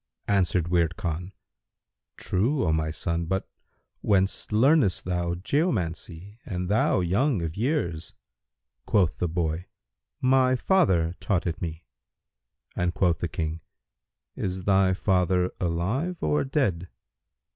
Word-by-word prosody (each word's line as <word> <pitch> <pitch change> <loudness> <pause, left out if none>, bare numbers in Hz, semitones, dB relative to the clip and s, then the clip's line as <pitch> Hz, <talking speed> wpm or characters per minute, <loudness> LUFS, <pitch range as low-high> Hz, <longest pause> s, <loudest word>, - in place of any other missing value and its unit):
'" - - -60
Answered 90 -4 +1
Wird 85 -1 +1
Khan, 90 -2 -3 0.9
"True, 120 +9 0
O 80 - +2
my 80 0 0
son, 85 +2 -2
but 95 +3 -2 0.5
whence 95 -1 +1
learnedest 115 - +3
thou 90 -1 -1
geomancy 95 - -2
and 90 -3 -4
thou 105 -2 +2
young 100 - +1
of 80 -1 -4
years?" 105 - -2 0.7
Quoth 85 -9 +2
the 90 - +1
boy, 80 0 -2 0.5
"My 130 0 +3
father 95 - +2
taught 95 -5 0
it 85 -2 -3
me;" 80 -1 -5 0.9
and 90 0 -1
quoth 90 -3 +2
the 85 - -1
King, 80 0 -4 0.7
"Is 95 0 -3
thy 95 -1 +3
father 90 -1 +1
alive 100 - -1
or 75 - +1
dead?" 95 - -1
90 Hz, 125 wpm, -26 LUFS, 85-105 Hz, 0.9 s, learnedest